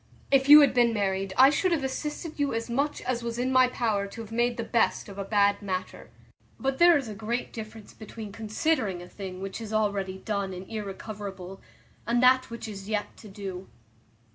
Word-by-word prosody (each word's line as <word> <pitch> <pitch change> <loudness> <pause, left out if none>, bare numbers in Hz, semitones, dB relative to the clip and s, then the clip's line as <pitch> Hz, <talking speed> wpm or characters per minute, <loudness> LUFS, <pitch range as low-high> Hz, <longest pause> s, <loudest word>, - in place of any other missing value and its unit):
If 270 0 +3
you 300 +1 +11
had 285 - +4
been 240 -2 +3
married 195 -1 -1
I 265 +2 +8
should 360 +5 +1
have 320 -5 +1
assisted 300 +4 -4
you 285 -4 0
as 230 +1 -3
much 280 +5 -1
as 250 -2 -2
was 235 0 -4
in 255 +2 0
my 255 -1 +5
power 220 -5 -1
to 200 +3 -9
have 225 -1 -10
made 240 +1 0
the 230 - -2
best 225 -5 +1
of 200 -1 -9
a - - -2
bad 200 0 +2
matter; 185 -2 -5 0.5
but 270 0 -1
there 345 -1 +7
is 275 -4 -4
a 215 - -6
great 225 +4 -4
difference 220 -1 -9
between 215 -1 -9
considering 215 - -1
a - - -11
thing 185 -1 -8
which 195 +3 -6
is 220 -1 -7
already 200 -3 -1
done 200 -1 -3
and 185 +1 -8
irrecoverable, 200 -3 -7 0.5
and 240 +1 +2
that 255 0 +5
which 235 -1 -7
is 200 -1 -8
yet 210 -1 -2
to 220 - -12
do. 195 -2 -7
220 Hz, 205 wpm, -27 LUFS, 200-250 Hz, 0.5 s, you